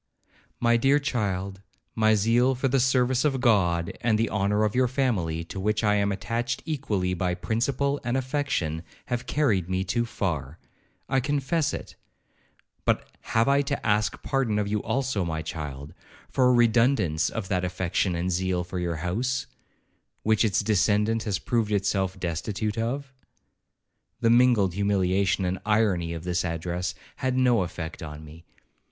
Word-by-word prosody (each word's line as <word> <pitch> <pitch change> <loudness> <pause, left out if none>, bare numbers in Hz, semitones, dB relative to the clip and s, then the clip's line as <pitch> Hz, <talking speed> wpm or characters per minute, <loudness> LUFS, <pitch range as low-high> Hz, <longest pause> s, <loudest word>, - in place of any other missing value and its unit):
My 120 0 +3
dear 135 +4 +4
child, 100 -8 -2 0.3
my 110 -1 +3
zeal 120 +5 +3
for 135 +2 0
the 135 +1 +2
service 130 0 +2
of 135 -3 +1
God, 90 -9 +2
and 110 -2 +2
the 115 +1 0
honour 105 +1 +1
of 105 -1 +1
your 125 0 +3
family, 105 - 0
to 90 +3 -7
which 105 +3 0
I 105 -1 +3
am 100 -1 +1
attached 115 +4 -2
equally 105 - -1
by 90 0 -1
principle 140 +7 -1
and 120 +2 0
affection, 130 - -1 0.2
have 125 0 -3
carried 105 - +1
me 95 0 0
too 120 +5 -1
far,—I 85 - -4
confess 145 +3 0
it; - - -7 0.9
but - - +1 0.3
have 115 +2 +4
I 140 +1 +4
to 140 0 -3
ask 105 0 +1
pardon 130 -6 0
of 105 -1 0
you 105 0 -1
also, 135 -7 -1
my 80 -2 -3
child, 75 -3 -6 0.4
for 130 -1 +3
a - - +5
redundance 115 - +3
of 110 -4 -4
that 90 -3 0
affection 90 0 -1
and 90 +2 -1
zeal 90 0 0
for 90 +1 -5
your 85 -1 -1
house, 125 +9 -1 0.8
which 110 0 +3
its 105 -4 +2
descendant 105 +2 +2
has 105 -4 0
proved 115 -4 -1
himself 95 -2 0
destitute 100 +5 -2
of?' 130 +4 -3 1.1
The 115 -2 +3
mingled 120 -6 +4
humiliation 95 -1 +1
and 90 +1 -1
irony 105 -6 +1
of 80 -1 -6
this 90 0 -1
address 90 +3 -3 0.2
had 130 0 -1
no 125 -5 +4
effect 85 0 -5
on 75 -1 -8
me. 80 +3 -13
105 Hz, 160 wpm, -26 LUFS, 90-125 Hz, 1.1 s, a